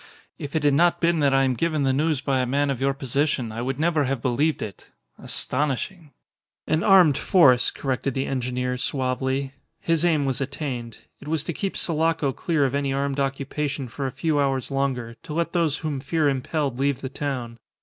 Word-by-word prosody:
"If 145 Hz, +2 st, -6 dB
it 155 Hz, -, +1 dB
had 145 Hz, -1 st, +4 dB
not 170 Hz, +4 st, +3 dB
been 170 Hz, -1 st, +2 dB
that 140 Hz, -2 st, +3 dB
I 135 Hz, 0 st, +4 dB
am 130 Hz, -1 st, +2 dB
given 155 Hz, +3 st, 0 dB
the 135 Hz, -1 st, +2 dB
news 150 Hz, 0 st, +1 dB
by 135 Hz, -2 st, 0 dB
a 125 Hz, -, 0 dB
man 140 Hz, +2 st, +1 dB
of 135 Hz, -, -4 dB
your 135 Hz, 0 st, +1 dB
position 135 Hz, -2 st, -1 dB
I 115 Hz, +2 st, -5 dB
would 135 Hz, +2 st, -3 dB
never 160 Hz, -2 st, +2 dB
have 135 Hz, 0 st, -1 dB
believed 135 Hz, +6 st, 0 dB
it. 100 Hz, -, -9 dB, 0.3 s
Astonishing!" 150 Hz, +5 st, -3 dB, 0.6 s
"An 155 Hz, -, +1 dB
armed 180 Hz, -8 st, +6 dB
force," 130 Hz, -10 st, +5 dB
corrected 135 Hz, -1 st, -2 dB
the 135 Hz, -, 0 dB
engineer, 125 Hz, -1 st, -2 dB
suavely. 130 Hz, +1 st, -1 dB, 0.3 s
His 165 Hz, -1 st, +1 dB
aim 160 Hz, -5 st, +2 dB
was 135 Hz, -1 st, -1 dB
attained. 130 Hz, -4 st, -4 dB, 0.2 s
It 145 Hz, -, -12 dB
was 155 Hz, -1 st, 0 dB
to 170 Hz, -, -4 dB
keep 195 Hz, +4 st, -3 dB
Sulaco 160 Hz, -3 st, +1 dB
clear 155 Hz, -2 st, 0 dB
of 130 Hz, -, -1 dB
any 140 Hz, -1 st, 0 dB
armed 140 Hz, 0 st, -1 dB
occupation 140 Hz, 0 st, -2 dB
for 135 Hz, +3 st, -4 dB
a -, -, -4 dB
few 145 Hz, +3 st, 0 dB
hours 135 Hz, -1 st, 0 dB
longer, 130 Hz, -4 st, -2 dB
to 150 Hz, -, -8 dB
let 170 Hz, 0 st, -1 dB
those 165 Hz, -4 st, +1 dB
whom 150 Hz, -4 st, -3 dB
fear 155 Hz, +2 st, 0 dB
impelled 135 Hz, -1 st, -1 dB
leave 140 Hz, -1 st, 0 dB
the 130 Hz, -, -3 dB
town. 125 Hz, -5 st, -4 dB
140 Hz, 200 wpm, -24 LUFS, 130-155 Hz, 0.6 s, armed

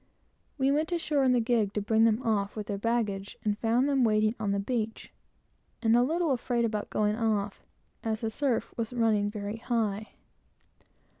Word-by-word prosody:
We 270 Hz, 0 st, +2 dB
went 310 Hz, +4 st, 0 dB
ashore 310 Hz, -5 st, +1 dB
in 260 Hz, -, +4 dB
the 250 Hz, -, +4 dB
gig 225 Hz, -3 st, +1 dB
to -, -, +1 dB
bring 220 Hz, +2 st, +3 dB
them 225 Hz, +2 st, +2 dB
off 205 Hz, -4 st, 0 dB
with 210 Hz, -1 st, -4 dB
their 200 Hz, -1 st, -4 dB
baggage, 205 Hz, -3 st, -1 dB
and 210 Hz, 0 st, 0 dB
found 240 Hz, +4 st, +2 dB
them 275 Hz, -3 st, +2 dB
waiting 215 Hz, -1 st, +3 dB
on 205 Hz, -2 st, -1 dB
the 200 Hz, -, +1 dB
beach, 220 Hz, +1 st, -3 dB, 0.7 s
and 225 Hz, 0 st, +4 dB
a 240 Hz, -, +5 dB
little 325 Hz, +4 st, +1 dB
afraid 240 Hz, -2 st, 0 dB
about 215 Hz, -2 st, -2 dB
going 210 Hz, 0 st, +1 dB
off, 215 Hz, -3 st, -1 dB, 0.4 s
as 220 Hz, -1 st, -2 dB
the 225 Hz, -1 st, -2 dB
surf 265 Hz, -1 st, -1 dB
was 230 Hz, +1 st, -3 dB
running 220 Hz, -4 st, +2 dB
very 205 Hz, 0 st, -5 dB
high. 220 Hz, -3 st, -2 dB
225 Hz, 180 wpm, -29 LUFS, 210-245 Hz, 0.7 s, a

